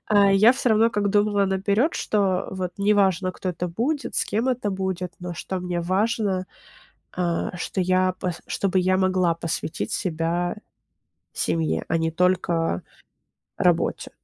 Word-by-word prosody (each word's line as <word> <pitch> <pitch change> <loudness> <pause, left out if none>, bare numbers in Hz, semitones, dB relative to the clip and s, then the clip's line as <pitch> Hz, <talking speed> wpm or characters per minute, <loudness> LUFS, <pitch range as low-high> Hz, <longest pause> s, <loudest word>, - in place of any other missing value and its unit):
а 200 -2 +5
я 215 +5 +6
всё 260 -1 -1
равно, 220 +1 +5
как 205 -2 0
думала 205 -1 +3
наперёд, 200 - +1
что 195 -3 0
вот 185 -2 -3
неважно, 195 -3 +2
кто 185 - -5
это 180 0 -3
будет, 270 - -2
с - - +1
кем 230 +5 -1
это 245 -5 0
будет, 190 -2 -3
но 180 0 -5
что 185 +3 -4
мне 180 -1 -2
важно, 190 +1 0 0.7
а, 175 0 -2
что 185 - -3
я 185 0 +2
п 180 - -2
чтобы 195 -1 0
я 185 +1 +2
могла 185 -2 +2
посвятить 165 -1 -4
себя 170 0 -1 0.8
семье, 80 -2 -1
а 165 - +1
не 165 0 0
только 170 - +1 0.8
работе. - - +1
185 Hz, 145 wpm, -24 LUFS, 175-205 Hz, 0.8 s, я